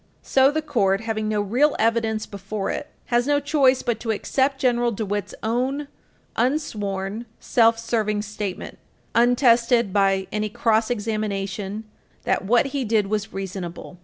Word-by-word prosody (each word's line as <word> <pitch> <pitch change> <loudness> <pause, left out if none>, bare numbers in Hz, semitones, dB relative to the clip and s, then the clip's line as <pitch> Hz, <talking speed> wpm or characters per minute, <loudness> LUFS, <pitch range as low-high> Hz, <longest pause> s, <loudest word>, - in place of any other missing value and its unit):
So 265 0 +4
the 310 +2 -1
Court, 195 -9 +1
having 220 -1 -2
no 210 -1 +1
real 250 +9 +2
evidence 225 -1 +1
before 200 0 -4
it, - - -4 0.3
has 240 +2 +3
no 290 0 +3
choice 280 -3 +3
but 235 -2 -1
to 230 - -6
accept 265 +5 0
General 240 -2 +2
DeWitt's 205 -1 -3
own 260 +6 -1 0.5
unsworn, 215 -5 -2
self 230 -2 +3
serving 215 -2 -1
statement, 205 -2 -6 0.3
untested 235 -3 +3
by 195 -1 +2
any 210 0 -1
cross 220 +1 +1
examination, 210 -2 -3 0.4
that - - 0
what 240 +7 +3
he 280 -2 0
did 220 -3 +2
was 215 -1 -1
reasonable. 185 -2 -6
220 Hz, 140 wpm, -23 LUFS, 205-245 Hz, 0.5 s, So